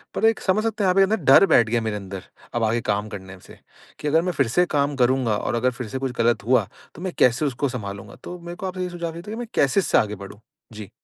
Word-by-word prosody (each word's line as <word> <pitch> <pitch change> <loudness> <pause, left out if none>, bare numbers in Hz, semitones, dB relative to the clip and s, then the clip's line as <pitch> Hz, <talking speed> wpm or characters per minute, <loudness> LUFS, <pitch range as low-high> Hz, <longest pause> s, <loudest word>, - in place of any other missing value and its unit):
पर - - +1
एक 225 0 +3
समझ 205 +3 +1
सकते 225 -2 -1
हैं 185 - +3
आप 190 - +2
ये 195 - +7
ना 215 +3 +1
डर - - +7
बैठ 115 - +4
गया 115 0 +1
मेरे 110 -2 -2
अंदर, 100 -1 -7 0.3
अब 120 - -1
आगे 115 +2 +1
काम 105 +1 -2
करने 95 -1 -9
से, - - -15 0.4
कि 150 - -4
अगर 160 +3 +3
मैं 180 +1 -1
फ़िर 140 -5 +1
से 175 +10 +2
काम 145 0 +1
करूँगा 125 -4 +2
और - - -2
अगर 125 +2 +1
फ़िर 125 -2 -7
से 130 - -4
कुछ 135 -1 -2
गलत 115 -3 +2
हुआ 125 +1 +3 0.3
तो 170 - -11
मैं 185 -2 -4
कैसे 125 +4 +4
उसको 140 +1 -1
सँभालूँगा। 100 -5 -7
तो 180 0 -7
मेरे 170 0 -8
को 190 +1 -5
आपसे 185 0 -4
ये 180 - -3
सुझाव 170 -1 -4
चाहिए 170 +1 -8
था 210 - -5
कि 225 - -5
मैं 240 - -5
कैसे 140 +7 +3
इससे - - +2
आगे 105 -1 +1
बढ़ूँ? 100 +2 -11 0.3
जी। 105 -2 -9
130 Hz, 285 wpm, -23 LUFS, 110-180 Hz, 0.4 s, ये